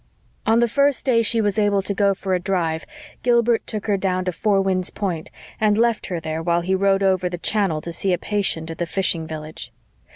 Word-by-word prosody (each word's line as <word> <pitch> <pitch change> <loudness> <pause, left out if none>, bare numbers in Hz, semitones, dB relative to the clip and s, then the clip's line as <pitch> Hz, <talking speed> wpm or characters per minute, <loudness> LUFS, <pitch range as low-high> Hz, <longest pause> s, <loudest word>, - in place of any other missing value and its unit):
On 225 +1 +4
the 240 - +4
first 280 +3 +1
day 240 -4 +3
she 225 0 +2
was 205 0 0
able 205 -2 +2
to 200 - -1
go 200 0 +2
for 190 0 -3
a 180 - +2
drive 175 -4 -2 0.3
Gilbert 235 -1 +2
took 215 -1 -5
her 205 -2 +1
down 185 -1 -1
to 180 - 0
Four 200 +2 +1
Winds 185 -2 +1
Point, 175 -6 -4 0.3
and 210 -1 +3
left 235 -1 +1
her 180 -3 -3
there 160 0 -4
while 170 +1 +1
he 185 +2 -1
rowed 195 +1 +2
over 185 -2 +2
the 175 - -5
channel 185 -4 0
to 170 - -5
see 190 +3 -1
a 180 - +2
patient 180 -6 -1
at 165 - -9
the 175 - -1
fishing 170 -3 0
village. 155 0 -8
195 Hz, 225 wpm, -22 LUFS, 175-210 Hz, 0.3 s, On